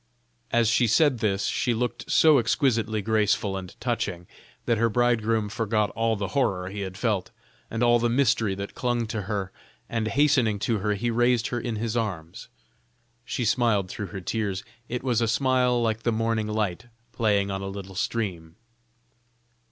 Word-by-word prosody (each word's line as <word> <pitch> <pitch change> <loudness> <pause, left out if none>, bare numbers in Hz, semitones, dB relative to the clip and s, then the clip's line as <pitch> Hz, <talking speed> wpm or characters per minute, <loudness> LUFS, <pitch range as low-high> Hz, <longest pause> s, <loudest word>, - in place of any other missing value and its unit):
As 115 -1 +3
she 115 +2 +3
said 130 +2 +3
this, 100 -3 0
she 120 -2 0
looked 125 +2 -3
so 155 -3 +6
exquisitely 115 -4 +1
graceful 105 -2 +1
and 95 -2 -8
touching, 85 0 -2 0.4
that 115 -2 +1
her 115 0 +3
bridegroom 115 -2 +1
forgot 105 0 0
all 115 0 0
the 100 -2 -3
horror 95 -7 0
he 100 - -6
had 95 -1 -5
felt, 105 -5 -1 0.4
and 115 +1 -1
all 120 0 +5
the 120 +1 +1
mystery 115 -5 +2
that 100 +1 -6
clung 120 -2 -1
to 110 -1 -3
her, 100 -3 -2 0.4
and 115 -1 -2
hastening 130 -5 +3
to 110 +2 0
her 105 +1 0
he 120 +4 -1
raised 120 0 +2
her 120 - -2
in 120 -1 -3
his 110 +1 -2
arms. 90 -8 -4 0.8
She 125 - -2
smiled 110 -5 +2
through 105 +2 -5
her 95 -1 -7
tears; 100 0 -2 0.3
it 125 +1 -3
was 120 -3 +1
a 115 - +2
smile 125 +1 +2
like 115 -1 0
the 120 - +1
morning 115 -1 0
light 105 0 -2 0.2
playing 105 -4 +1
on 95 0 -3
a 95 - -4
little 95 -1 -7
stream. 90 -5 -3
110 Hz, 175 wpm, -26 LUFS, 100-120 Hz, 0.8 s, so